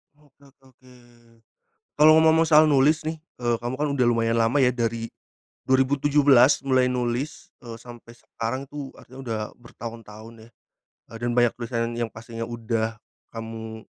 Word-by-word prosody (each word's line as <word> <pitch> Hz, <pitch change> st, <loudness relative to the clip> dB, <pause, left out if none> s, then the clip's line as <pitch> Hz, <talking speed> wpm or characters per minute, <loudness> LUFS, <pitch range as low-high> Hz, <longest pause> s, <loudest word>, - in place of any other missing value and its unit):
Oke 145 Hz, -2 st, -29 dB
oke 135 Hz, 0 st, -27 dB
oke, 130 Hz, 0 st, -21 dB, 1.1 s
kalau 155 Hz, +1 st, +7 dB
ngomong-ngomong 160 Hz, +1 st, +4 dB
soal 155 Hz, 0 st, +7 dB
nulis 150 Hz, +1 st, +3 dB
nih 160 Hz, +1 st, -4 dB, 0.2 s
e 120 Hz, -, -6 dB
kamu 120 Hz, +2 st, -4 dB
kan 150 Hz, +2 st, -1 dB
udah 130 Hz, -3 st, +1 dB
lumayan 115 Hz, -1 st, +1 dB
lama 115 Hz, +5 st, +2 dB
ya 125 Hz, -, +3 dB
dari, 115 Hz, -1 st, -3 dB, 0.6 s
2017 135 Hz, 0 st, +4 dB
mulai 130 Hz, -1 st, +3 dB
nulis 125 Hz, +9 st, -3 dB
e 120 Hz, -3 st, -9 dB
sampai 120 Hz, -1 st, -13 dB
sekarang 120 Hz, +3 st, -5 dB
tuh 145 Hz, -2 st, -8 dB
artinya 130 Hz, +2 st, -13 dB
udah 115 Hz, -2 st, -2 dB, 0.2 s
bertahun-tahun 115 Hz, -2 st, -11 dB
ya, -, -, -19 dB, 0.6 s
e -, -, -18 dB
dan 120 Hz, 0 st, -1 dB
banyak 120 Hz, -1 st, +4 dB
tulisan 115 Hz, -1 st, -3 dB
yang 115 Hz, -1 st, -3 dB
pastinya 115 Hz, +1 st, -8 dB
udah, 115 Hz, -1 st, -3 dB, 0.3 s
kamu 110 Hz, -1 st, -8 dB
120 Hz, 150 wpm, -24 LUFS, 115-140 Hz, 1.1 s, kalau